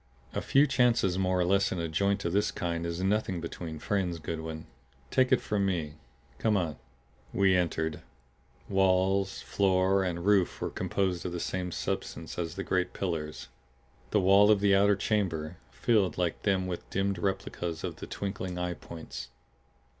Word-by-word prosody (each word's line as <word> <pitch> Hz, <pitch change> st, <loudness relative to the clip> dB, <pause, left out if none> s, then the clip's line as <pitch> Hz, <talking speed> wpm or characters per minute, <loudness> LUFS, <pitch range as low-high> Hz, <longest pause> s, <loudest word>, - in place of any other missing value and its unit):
"A -, -, -1 dB
few 140 Hz, +2 st, +4 dB
chances 120 Hz, -9 st, +2 dB
more 95 Hz, -1 st, +1 dB
or 90 Hz, -, +3 dB
less 95 Hz, +2 st, +2 dB
in 95 Hz, -, -2 dB
a 85 Hz, -1 st, -1 dB
joint 100 Hz, +4 st, 0 dB
of 85 Hz, -, 0 dB
this 105 Hz, +2 st, +2 dB
kind 85 Hz, -1 st, -2 dB
is 85 Hz, +2 st, -3 dB
nothing 95 Hz, -2 st, +1 dB
between 85 Hz, -1 st, -6 dB
friends, 90 Hz, 0 st, -1 dB
Goodwin; 80 Hz, 0 st, -5 dB, 0.5 s
take 130 Hz, 0 st, +3 dB
it 130 Hz, -, +5 dB
from 105 Hz, -2 st, 0 dB
me. 85 Hz, -6 st, -1 dB, 0.5 s
Come 110 Hz, -2 st, +2 dB
on." 80 Hz, -5 st, -2 dB, 0.5 s
We 95 Hz, -1 st, +3 dB
entered. 80 Hz, -3 st, 0 dB, 0.7 s
Walls, 95 Hz, 0 st, +2 dB
floor 95 Hz, 0 st, +2 dB
and 85 Hz, -1 st, -3 dB
roof 100 Hz, -3 st, +3 dB
were -, -, -3 dB
composed 95 Hz, -3 st, -1 dB
of 90 Hz, -, -4 dB
the 85 Hz, -, -3 dB
same 90 Hz, +1 st, -3 dB
substance -, -, -4 dB
as 85 Hz, -1 st, -3 dB
the 95 Hz, -, -3 dB
great 90 Hz, -1 st, 0 dB
pillars, 80 Hz, -5 st, -4 dB, 0.6 s
the 105 Hz, -, +3 dB
wall 100 Hz, +2 st, +6 dB
of 105 Hz, -2 st, +5 dB
the 100 Hz, -1 st, +4 dB
outer 100 Hz, +1 st, +5 dB
chamber; 90 Hz, -6 st, -1 dB
filled 105 Hz, -6 st, +1 dB
like 90 Hz, -2 st, -1 dB
them 95 Hz, -2 st, +1 dB
with 90 Hz, -1 st, -5 dB
dimmed 95 Hz, -1 st, 0 dB
replicas 85 Hz, -3 st, -3 dB
of -, -, -4 dB
the -, -, -7 dB
twinkling 95 Hz, -2 st, -4 dB
eye 90 Hz, 0 st, -1 dB
points. 85 Hz, -1 st, -8 dB
95 Hz, 170 wpm, -29 LUFS, 85-100 Hz, 0.7 s, wall